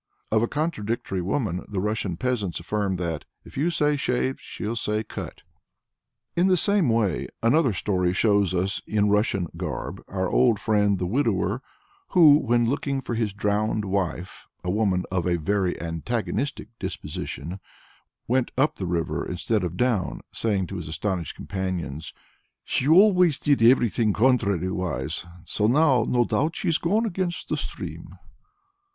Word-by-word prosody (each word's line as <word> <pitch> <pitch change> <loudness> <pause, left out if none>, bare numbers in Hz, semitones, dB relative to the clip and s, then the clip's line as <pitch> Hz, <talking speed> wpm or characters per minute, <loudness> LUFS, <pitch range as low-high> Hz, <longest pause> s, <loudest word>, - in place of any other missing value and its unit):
Of 110 0 +3
a 120 - +2
contradictory 120 - -2
woman 95 -1 -1
the 100 - -2
Russian 105 -3 -1
peasants 115 -6 -1
affirm 100 +2 -1
that, 85 -4 -3 0.2
"If - - -14
you 150 +6 +1
say 150 -3 +2
'shaved' 130 -1 -1
she'll 110 +3 -5
say 105 -1 -1
'cut.'" - - -8 0.9
In 175 +2 +3
the 185 -1 +4
same 200 -5 +2
way 115 -4 +1 0.2
another 130 +3 +4
story 90 -2 0
shows 100 0 +2
us 95 +2 -1
in 105 -1 +2
Russian 105 -4 +1
garb - - -4
our 95 -1 -2
old 120 0 +3
friend 105 -3 +2
the 90 - -2
widower 110 0 0 0.6
who, 155 -4 +9
when 120 -2 +2
looking 140 +1 -1
for 120 - -5
his 110 -2 0
drowned 105 +1 0
wife 95 -2 -3 0.2
a 90 - -1
woman 95 -3 +1
of 90 -1 0
a 90 - +2
very 95 +2 0
antagonistic 115 - -3
disposition 85 +7 -5 0.7
went 130 +1 +1
up 140 +4 +2
the 95 - -3
river 85 -2 -1
instead 95 +4 -1
of 90 0 -3
down, 120 -6 0
saying 100 -4 0
to 95 +2 -6
his 85 - -6
astonished 90 +1 -3
companions, 90 -6 -4 0.5
"She 130 - -1
always 180 -2 +6
did 140 -3 +2
everything 115 -3 +4
contrary 100 -7 +2
wise, 80 -3 -3 0.2
so 105 - +1
now, 130 -2 +4
no 120 -1 +3
doubt, 155 +7 0
she's 165 - 0
gone 210 +7 +1
against 180 -4 -3
the - - +1
stream." - - -7
105 Hz, 150 wpm, -25 LUFS, 95-130 Hz, 0.9 s, who